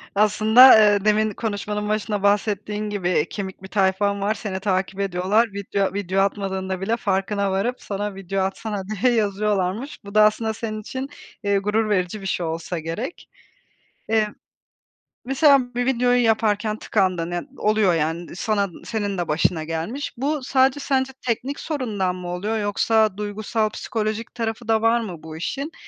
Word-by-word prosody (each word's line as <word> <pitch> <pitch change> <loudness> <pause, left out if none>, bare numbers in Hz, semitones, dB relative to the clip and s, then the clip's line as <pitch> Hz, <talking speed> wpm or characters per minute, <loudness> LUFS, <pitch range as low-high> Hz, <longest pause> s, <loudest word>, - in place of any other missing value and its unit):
Aslında, 220 +4 +7
eee, 205 -1 +4
demin 215 0 +3
konuşmanın 210 -1 -3
başında 210 -1 -1
bahsettiğin 210 +1 0
gibi, 195 -4 -2
eee, 165 -3 +1
kemik 190 -2 -6
bir - - -7
tayfan 200 +1 +1
var, 210 +2 +1
seni 200 -3 -5
takip 190 0 -1
ediyorlar. 195 +4 +1
Video 200 -1 -1
video 195 -1 0
atmadığında 190 -2 -2
bile 225 +4 0
farkına 200 -1 0
varıp 230 +7 -1
sana 205 0 -4
video 195 0 -3
atsana 195 +1 -3
diye 215 +4 +1
yazıyorlarmış. 210 +3 -1
Bu 200 +1 -10
da 215 - +7
aslında 220 +1 +2
senin 215 0 -5
için, 260 +5 -5 0.3
eee, 200 -1 +2
gurur 210 +2 0
verici 195 0 0
bir - - -8
şey 180 -2 -1
olsa 165 +1 -3
gerek. 165 - -6 0.8
Eee, 220 -1 +2 1.0
mesela 270 -2 +3
bir 245 +1 -1
videoyu 245 -1 +3
yaparken 215 -1 +1
tıkandın, 185 -6 0
ya 175 0 -2 0.2
oluyor 210 -4 +3
yani 165 +2 -2
sana, 200 -1 0 0.2
senin 205 -4 -2
de 175 - -2
başına 160 +1 +1
gelmiş. 165 - -4
Bu 285 +3 -1
sadece 265 +1 +2
sence 265 -1 0
teknik 255 +4 -2
sorundan 210 - -2
mı 180 -1 -7
oluyor 205 +5 -2
yoksa 215 0 +2
duygusal, 210 +1 -1
psikolojik 220 +1 -3
tarafı 225 0 -4
da 220 -1 +2
var 230 +1 +3
mı 180 -9 -7
bu 160 0 -8
işin? 275 - -4
210 Hz, 160 wpm, -23 LUFS, 190-225 Hz, 1.0 s, Aslında